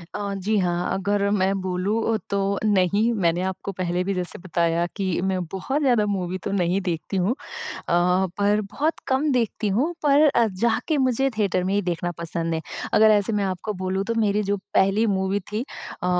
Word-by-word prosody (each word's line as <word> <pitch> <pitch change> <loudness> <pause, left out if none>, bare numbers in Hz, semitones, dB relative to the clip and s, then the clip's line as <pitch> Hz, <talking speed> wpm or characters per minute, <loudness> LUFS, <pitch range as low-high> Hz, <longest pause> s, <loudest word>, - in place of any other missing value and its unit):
अ, 200 -1 -3
जी 205 +3 0
हाँ, 175 -1 0
अगर 200 +1 0
मैं 195 -1 +2
बोलूँ 200 +5 0
तो 200 - 0 0.3
नहीं 205 +3 +3
मैंने 175 -5 +1
आपको 190 +1 -6
पहले 180 -1 -1
भी 195 - -1
जैसे 180 -2 -3
बताया 170 -1 0
कि 200 - -2 0.2
मैं 190 -1 0
बहुत 265 +10 -2
ज़्यादा 240 -6 +3
मूवी 185 -3 -2
तो - - -3
नहीं 190 0 +1
देखती 180 +2 -3
हूँ 185 +5 +2 0.4
अ, 180 - +1
पर 205 +1 +3
बहुत 215 +11 -2
कम 270 +3 +1
देखती 230 -3 0
हूँ, 255 - +1
पर 290 0 +5
अ, 235 -4 +3
जाके 230 - 0
मुझे 265 0 +2
थिएटर 190 -4 +1
में 190 +2 0
ही 205 - +3
देखना 175 -1 -2
पसंद 165 0 -2
है। 160 - -1 0.3
अगर 220 0 +6
ऐसे 210 0 +3
मैं 205 -1 +1
आपको 190 +3 -3
बोलूँ 190 +1 -1
तो 230 - -2
मेरी 210 -1 +2
जो 200 0 0 0.2
पहली 200 +4 +3
मूवी 190 +2 0
थी 220 +4 -1 0.4
अ, 180 - -1
200 Hz, 190 wpm, -24 LUFS, 180-220 Hz, 0.4 s, अगर